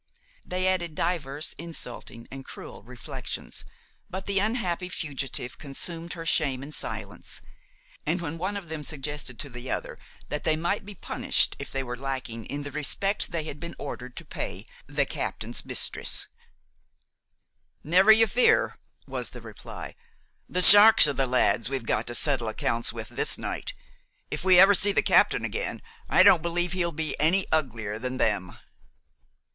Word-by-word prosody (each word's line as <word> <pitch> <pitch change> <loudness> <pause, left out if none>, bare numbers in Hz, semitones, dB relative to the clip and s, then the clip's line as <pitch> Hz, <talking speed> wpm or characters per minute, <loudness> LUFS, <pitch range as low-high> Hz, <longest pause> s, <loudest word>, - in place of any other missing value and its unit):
They 185 +1 -2
added 175 -4 -1
divers 150 -4 -2
insulting 125 -8 -6
and 135 0 -8
cruel - - -11
reflections, 125 +3 -7 0.5
but 190 +1 -6
the 200 -1 0
unhappy 190 -5 -2
fugitive 135 -7 -4
consumed 165 +4 -5
her 165 -2 -8
shame 140 -5 +1
in 145 - -9
silence; - - -5 0.6
and 175 - -1
when 165 -1 -6
one 195 +4 -3
of 195 -4 -9
them 160 -2 -6
suggested 145 -4 -4
to 145 - -6
the 125 -1 -9
other - - -5 0.3
that 150 - -4
they 160 - +2
might 175 +5 -2
be 205 - -9
punished - - 0
if - - -7
they 135 0 -2
were 125 -1 -6
lacking 130 -3 -6
in 145 +1 -5
the 145 - -7
respect 175 +8 0
they 165 -2 -3
had 150 -2 -8
been 170 +2 -8
ordered 125 0 -8
to - - -8
pay - - -6 0.2
the - - 0
captain's - - -4
mistress: - - +3 1.6
"Never 185 +7 +5
you 225 +1 +7
fear!" 245 +4 +2 0.3
was - - -5
the - - -11
reply; - - -10 0.6
"the 180 - +4
sharks 210 +1 +11
are 145 - -1
the 135 -1 0
lads 125 -2 +2
we've 135 -4 -4
got 110 +1 -1
to 120 - -3
settle 135 -5 +1
accounts 115 +1 -1
with - - -8
this - - +1
night. - - -5 0.6
If - - -4
we 185 -1 +6
ever 195 +2 +8
see 205 +1 +6
the - - +2
captain - - +3
again, 470 +2 -3 0.3
I - - +5
don't 170 - +6
believe 175 +1 -1
he'll 175 -2 0
be 155 -2 -3
any 180 +5 +2
uglier 115 -9 -2
than 125 +2 -5
them." 100 -7 -1
155 Hz, 165 wpm, -26 LUFS, 130-180 Hz, 1.6 s, sharks